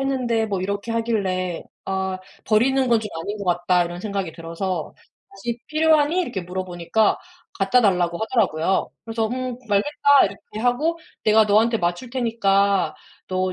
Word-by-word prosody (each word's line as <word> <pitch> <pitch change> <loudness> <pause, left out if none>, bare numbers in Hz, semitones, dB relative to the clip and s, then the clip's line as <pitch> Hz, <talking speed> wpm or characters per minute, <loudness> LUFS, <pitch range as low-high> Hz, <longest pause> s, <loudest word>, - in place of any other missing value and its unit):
했는데." 250 -5 0
뭐 195 -3 -2
이렇게 200 +4 -3
하길래 195 -6 -1 0.2
'아. 190 -1 -2 0.3
버리는 235 +5 +3
건 230 -2 +4
좀 215 - -5
아닌 205 +5 -4
것 200 - -5
같다.' 175 0 +2
이런 175 +1 -6
생각이 195 -4 -3
들어서 165 +3 -4 0.4
"다시 240 -12 -5
필요하니?" 310 +2 +3
이렇게 240 - -3
물어보니까 180 +3 0 0.4
갖다 195 +6 +4
달라고 180 -5 +2
하더라고요. 195 -7 +1 0.2
그래서 225 -1 -1
"음. 255 +1 -3
알겠다." 285 +7 +3
이렇게 215 - -9
하고 270 +8 +1 0.3
내가 220 0 +5
너한테 220 +3 +3
맞출 175 +8 -2
테니까 200 -6 +1 0.3
너 185 0 0
210 Hz, 335 characters per minute, -22 LUFS, 185-235 Hz, 0.4 s, 내가